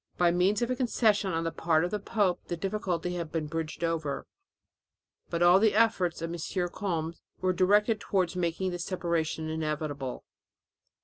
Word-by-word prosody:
By 175 -1 +4
means 190 +6 +2
of 240 - -1
a - - +1
concession 220 -6 +2
on 165 -1 -1
the 165 - -1
part 160 0 +2
of 180 - -4
the 210 - -1
pope 200 -3 0
the 175 - -3
difficulty 180 -2 -2
had 170 -3 -4
been 160 -2 -1
bridged 160 +1 -4
over, 160 -4 -1 1.0
but 170 0 0
all 175 +2 +7
the 215 -1 +3
efforts 190 -7 +2
of 165 +1 -3
M. 175 +2 -2
Combes 170 -4 -3 0.2
were 185 0 +1
directed 210 +4 +3
towards 185 -4 0
making 180 +1 -1
the 175 - -4
separation 170 -3 -1
inevitable. 150 -4 -3
175 Hz, 170 wpm, -29 LUFS, 165-195 Hz, 1.0 s, all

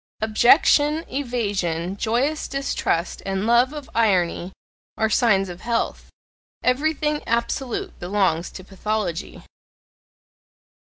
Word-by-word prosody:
Objection, 290 +8 +4
evasion, 200 - -2
joyous 245 +9 0
distrust, 275 -10 -2
and 195 +1 -2
love 240 +3 +4
of 295 -3 -8
irony 185 -5 +1 0.5
are 220 0 +1
signs 200 -4 +3
of 175 0 -9
health; 235 0 -2 0.5
everything 300 +3 +1
absolute 235 +2 -2
belongs 180 -3 0
to 185 - -10
pathology. 195 -2 -4
220 Hz, 95 wpm, -23 LUFS, 190-260 Hz, 0.5 s, Objection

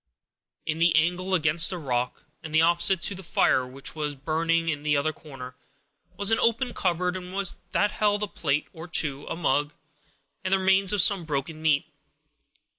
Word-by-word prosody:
In 160 0 -2
the 170 -1 +4
angle 180 +4 +1
against 165 0 +2
the 185 - -3
rock, 125 -5 -3 0.2
and 160 0 -6
opposite 170 +2 +3
to 200 - 0
the 190 - -9
fire 130 -7 +1
which 135 +2 -6
was 150 -2 -3
burning 165 +4 0
in 150 -3 -1
the 150 -1 +1
other 155 +2 0
corner, 130 -5 -11 0.6
was 205 +1 +1
an 225 - +3
open 235 +2 +1
cupboard, 180 0 0 0.6
that 205 - +1
held 205 0 0
a - - -1
plate 150 -6 -1
or 160 +1 -9
two, 145 -4 -1
a - - -3
mug, 145 -3 0 0.7
and 185 - -2
the 195 - +5
remains 190 0 +3
of 205 -3 +5
some 195 -3 +3
broken 155 +1 -4
meat. 150 -3 +2
165 Hz, 175 wpm, -26 LUFS, 150-185 Hz, 0.7 s, the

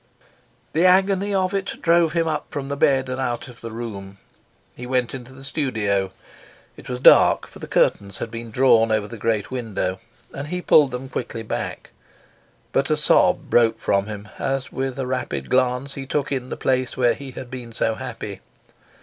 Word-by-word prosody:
The 165 - +2
agony 195 +2 +3
of 190 -1 +1
it 195 -1 -3
drove 170 -1 +3
him 165 -1 +1
up 155 -1 -2
from 140 -1 -5
the 140 - -2
bed 135 -2 +3
and 130 +1 -3
out 120 -2 -2
of 125 -2 -14
the 115 - -6
room. 100 -4 -7 0.6
He 125 - -7
went 125 -2 0
into 130 -1 -8
the 135 +1 -13
studio. 110 -10 -1 0.6
It - - -12
was 125 0 -3
dark, - - +6
for - - -14
the - - -7
curtains 100 -1 +1
had 115 - -5
been 115 0 -6
drawn 115 -2 +4
over 110 -1 +1
the 115 0 -9
great 110 0 -1
window, 105 -7 -2 0.3
and 140 +1 -5
he 180 +3 -3
pulled 150 -5 +5
them 125 +1 -5
quickly 115 -3 -5
back; 110 - -5 0.8
but - - +1
a - - +2
sob - - +3
broke 115 -1 +4
from 100 -2 0
him 105 -1 -7
as 135 0 -2
with 135 -1 -3
a 135 - -2
rapid 130 0 -3
glance 130 +2 +1
he 135 -1 -7
took 145 0 -1
in 130 -2 -2
the - - -4
place 130 -2 0
where 120 -2 +4
he 140 +1 -9
had 120 0 -8
been 125 -3 -7
so 115 0 0
happy. 110 -5 -6
125 Hz, 190 wpm, -22 LUFS, 115-140 Hz, 0.8 s, dark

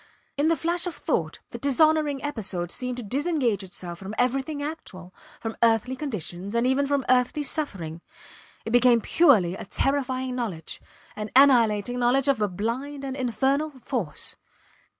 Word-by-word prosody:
In 290 +2 +1
the 330 - +4
flash 345 +2 0
of 350 - -4
thought - - -1
the - - -7
dishonouring 295 0 +2
episode 195 -11 -2
seemed 250 -1 -4
to 245 - -5
disengage 260 - 0
itself 175 -2 -7
from 195 +3 -7
everything 270 +4 0
actual, 185 - -7 0.3
from 225 -1 -5
earthly 230 +2 +3
conditions, 205 - -4
and 235 +1 +2
even 265 +2 +2
from 280 -2 0
earthly 255 +4 +2
suffering; 185 - -4 0.6
it 225 - -4
became 245 -1 +5
purely 215 - +4
a - - -6
terrifying 260 +1 -1
knowledge, 200 -11 -4 0.3
an 210 0 -5
annihilating 245 -4 +5
knowledge 250 +3 +2
of 275 -6 +2
a 210 - +3
blind 245 +9 -4
and 265 -1 -4
infernal 270 +4 0
force. 200 - -1
250 Hz, 150 wpm, -25 LUFS, 210-280 Hz, 0.6 s, became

